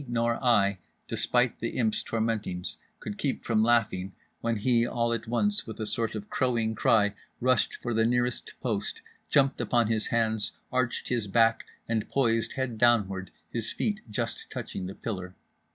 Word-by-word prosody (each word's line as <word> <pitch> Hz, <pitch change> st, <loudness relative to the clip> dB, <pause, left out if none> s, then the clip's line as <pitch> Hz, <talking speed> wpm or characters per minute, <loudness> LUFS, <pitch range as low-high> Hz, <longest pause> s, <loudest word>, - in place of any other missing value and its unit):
nor 115 Hz, +1 st, 0 dB
I, 100 Hz, -6 st, +3 dB, 0.3 s
despite 125 Hz, -1 st, +1 dB
the 115 Hz, -, -3 dB
Imp's 110 Hz, -3 st, +2 dB
tormentings, 110 Hz, -5 st, -2 dB, 0.2 s
could 105 Hz, -1 st, -6 dB
keep 140 Hz, -, -1 dB
from 110 Hz, -2 st, +2 dB
laughing 110 Hz, -5 st, +2 dB, 0.3 s
when 115 Hz, 0 st, 0 dB
he 115 Hz, +2 st, +3 dB
all 120 Hz, 0 st, 0 dB
at 115 Hz, 0 st, -3 dB
once 205 Hz, -, +2 dB
with 110 Hz, -, -7 dB
a 110 Hz, -, -2 dB
sort 115 Hz, +1 st, 0 dB
of 210 Hz, -, -5 dB
crowing 125 Hz, -, 0 dB
cry 105 Hz, -2 st, +3 dB, 0.3 s
rushed 130 Hz, +1 st, +2 dB
for 120 Hz, -, -1 dB
the 110 Hz, 0 st, +3 dB
nearest 120 Hz, +1 st, 0 dB
post, 110 Hz, -5 st, -2 dB, 0.3 s
jumped 140 Hz, -1 st, +3 dB
upon 120 Hz, -3 st, +2 dB
his 110 Hz, -1 st, 0 dB
hands, 110 Hz, -2 st, +1 dB, 0.2 s
arched 125 Hz, -2 st, 0 dB
his 120 Hz, -4 st, 0 dB
back, 115 Hz, +3 st, +3 dB, 0.2 s
and 115 Hz, -2 st, -1 dB
poised 115 Hz, -4 st, +1 dB
head 130 Hz, -4 st, -3 dB
downward; 100 Hz, -6 st, +3 dB, 0.2 s
his 115 Hz, -2 st, -2 dB
feet 215 Hz, -1 st, -1 dB
just 105 Hz, -, -3 dB
touching 90 Hz, -, -5 dB
the 95 Hz, -, -7 dB
pillar. 95 Hz, -4 st, -5 dB
115 Hz, 165 wpm, -28 LUFS, 110-120 Hz, 0.3 s, I